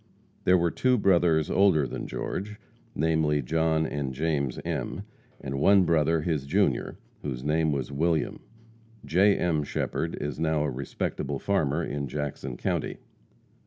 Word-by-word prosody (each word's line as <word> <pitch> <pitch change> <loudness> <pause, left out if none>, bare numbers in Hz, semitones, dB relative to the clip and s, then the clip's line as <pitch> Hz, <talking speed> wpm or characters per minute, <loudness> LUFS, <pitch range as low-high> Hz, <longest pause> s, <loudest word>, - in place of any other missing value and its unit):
There 90 0 +6
were 85 -1 +1
two 130 -1 +2
brothers 85 -6 +3
older 95 -7 +4
than - - -5
George, 105 +3 -4 0.4
namely, 75 -2 +1
John 80 +3 +1
and 70 -3 -3
James 70 -3 -1
M., - - -3 0.4
and 70 0 -4
one 100 +5 +6
brother 80 -1 +2
his 75 -4 -2
junior, - - +1 0.2
whose 65 -3 -4
name 80 +1 +1
was 70 -1 -2
William. 80 +2 0 0.7
J. 95 +7 +4
M. 80 -4 +1
Shepherd 80 +3 -2
is 75 -2 -4
now 80 -2 +1
a 75 - -1
respectable 70 +1 -3
farmer 80 -3 0
in 70 -2 -3
Jackson 70 -2 -4
county. - - -2
80 Hz, 140 wpm, -27 LUFS, 70-85 Hz, 0.7 s, There